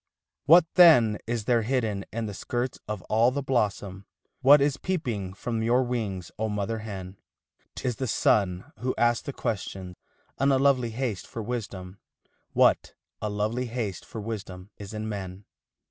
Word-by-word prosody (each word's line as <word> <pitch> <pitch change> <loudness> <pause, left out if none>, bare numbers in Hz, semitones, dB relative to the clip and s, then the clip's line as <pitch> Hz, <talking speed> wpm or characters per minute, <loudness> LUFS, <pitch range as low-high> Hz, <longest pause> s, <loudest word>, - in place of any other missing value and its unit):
What 165 +2 +8
then 125 - +7
is 115 -2 -2
there 120 0 +3
hidden 110 -4 -1
in 115 0 -3
the 105 - -5
skirts 120 +5 -3
of 105 -4 -4
all 115 +3 +3
the 140 +2 -3
blossom, 100 -6 -1 0.3
What 140 +2 +8
is 140 0 +2
peeping 120 - -3
from 115 +2 -3
your 120 +3 +3
wings, 105 -8 -3
oh 110 0 0
mother 105 +2 -2
hen? 95 -3 -7 0.6
'T - - -4
is 125 - 0
the 130 - -2
sun 95 -5 +1
who 125 +3 -2
asks 120 -1 +2
the 140 - -5
question, 95 -6 -4 0.4
in 140 +1 +3
a 135 - +4
lovely 130 -3 +3
haste 115 -5 -3
for 115 - -6
wisdom 100 -5 -5 0.5
What - - +3 0.3
a 105 - -1
lovely 110 +5 -1
haste 115 -6 -4
for 115 - -8
wisdom 100 -3 -7
is 100 -1 -9
in 110 0 -4
men? 100 -2 -6
110 Hz, 165 wpm, -27 LUFS, 100-125 Hz, 0.6 s, What